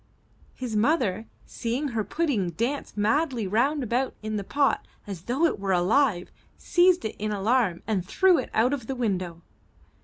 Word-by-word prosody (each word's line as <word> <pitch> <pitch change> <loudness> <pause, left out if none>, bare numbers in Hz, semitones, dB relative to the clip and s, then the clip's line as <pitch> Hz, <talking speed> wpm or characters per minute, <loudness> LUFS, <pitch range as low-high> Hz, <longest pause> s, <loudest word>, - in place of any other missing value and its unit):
His 245 -4 -4
mother, 220 - +1 0.2
seeing 250 +5 -3
her 225 -3 -1
pudding 255 - -1
dance 235 - -3
madly 245 +2 +1
round 260 +9 +1
about 250 +3 -1
in 215 0 -3
the 205 - -2
pot 280 +7 0 0.2
as 190 -4 -8
though 265 +7 +1
it 320 - 0
were 195 -1 0
alive, 185 +2 +2 0.3
seized 355 -2 +3
it 220 - -3
in 215 +1 -2
alarm 205 -3 +1
and 205 -5 -1
threw 365 - +3
it 255 - -4
out 240 +5 +2
of 250 -6 -4
the 270 - -3
window. 185 -8 -2
230 Hz, 165 wpm, -26 LUFS, 200-275 Hz, 0.3 s, seized